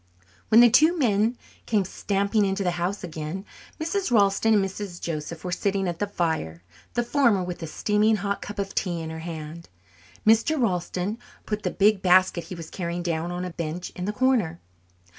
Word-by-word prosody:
When 225 +2 +8
the 240 - +8
two 315 +8 +5
men 230 -3 +2 0.3
came 210 -4 +2
stamping 200 +3 0
into 195 0 0
the 180 - +1
house 195 +4 -2
again 165 +3 -5 0.3
Mrs. 350 +4 -1
Ralston 215 -1 +4
and 200 -2 +3
Mrs. 190 -2 -6
Joseph 160 0 -5
were 180 - -3
sitting 195 0 0
at 170 -1 -3
the 205 - 0
fire, 160 - -2 0.3
the 240 - +2
former 240 -7 +3
with 180 -1 -6
a 165 - -4
steaming 210 +6 +2
hot 200 -1 -2
cup 205 - -7
of 195 -1 -3
tea 175 -4 -1
in 160 -1 -5
her 160 - -6
hand. 160 0 -7 0.6
Mr. 225 +8 +4
Ralston 185 0 -1 0.3
put 210 0 -3
the 185 - -1
big 200 +1 +3
basket 185 -1 +4
he 185 - -7
was 165 -2 -9
carrying 175 -1 -3
down 170 0 -2
on 180 +1 -3
a 180 - -5
bench 170 +1 -5
in 180 - -5
the 205 - 0
corner. 215 -8 +1
195 Hz, 190 wpm, -25 LUFS, 170-215 Hz, 0.6 s, When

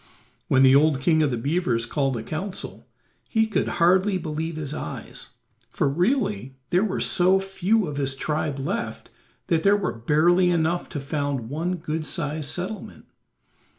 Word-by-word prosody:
When 130 0 +4
the 130 0 +7
old 145 -1 +4
king 155 +3 +3
of 150 - +3
the 120 - -2
beavers 125 -3 0
called 135 0 -1
a 110 - -5
council, 185 - -6 0.4
he 220 -1 +3
could 220 - -1
hardly 185 +3 +4
believe 160 -1 -4
his 150 -2 -4
eyes, 80 - -6 0.4
for - - 0
really 140 - 0
there 180 +3 +3
were 200 -3 -1
so 185 +1 +4
few 195 +2 +1
of 150 -3 -5
his 135 -1 -1
tribe 150 0 -2
left 190 +13 -4 0.3
that 165 -2 +1
there 200 +3 +4
were 195 -3 -2
barely 165 +10 +3
enough 170 0 0
to 145 - -4
found 140 -4 -3
one 165 +6 -2
good 160 -2 -3
sized 150 -3 -2
settlement. 190 +4 -6
160 Hz, 160 wpm, -24 LUFS, 140-180 Hz, 0.4 s, the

